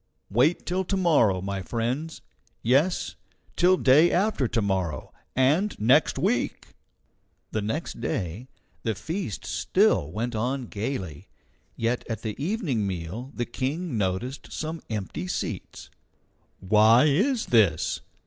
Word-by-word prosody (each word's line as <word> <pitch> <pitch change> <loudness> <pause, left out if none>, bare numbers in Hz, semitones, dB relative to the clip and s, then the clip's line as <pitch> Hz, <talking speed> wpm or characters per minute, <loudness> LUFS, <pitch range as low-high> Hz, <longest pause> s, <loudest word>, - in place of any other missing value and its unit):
Wait 125 - +2
till 185 +2 0
to 195 +2 -1
morrow, 130 - +3
my 100 0 -3
friends; 125 - -3 0.4
yes, 140 +10 +2 0.4
till 185 +1 +4
day 150 +5 +5
after 185 - +1
to 115 - 0
morrow, 95 -6 -2 0.2
and 150 +11 +2
next 115 +5 +4
week!" - - -1 0.8
The 110 - -1
next 115 +5 -4
day 105 +1 -3 0.3
the 110 -3 -1
feast 160 - -4
still 75 - +2
went 115 +6 -3
on 125 +4 -1
gayly; 100 - -5 0.5
yet 115 +2 -1
at 115 -2 -4
the 110 -2 -3
evening 155 - -1
meal 95 +8 -5
the 120 - -1
King 140 +6 -3
noticed 105 +7 -2
some 160 +1 -4
empty 110 - -4
seats. 180 - -5 0.7
"Why 110 +5 +5
is 210 - +2
this?" 95 -9 +2
120 Hz, 125 wpm, -26 LUFS, 105-160 Hz, 0.8 s, day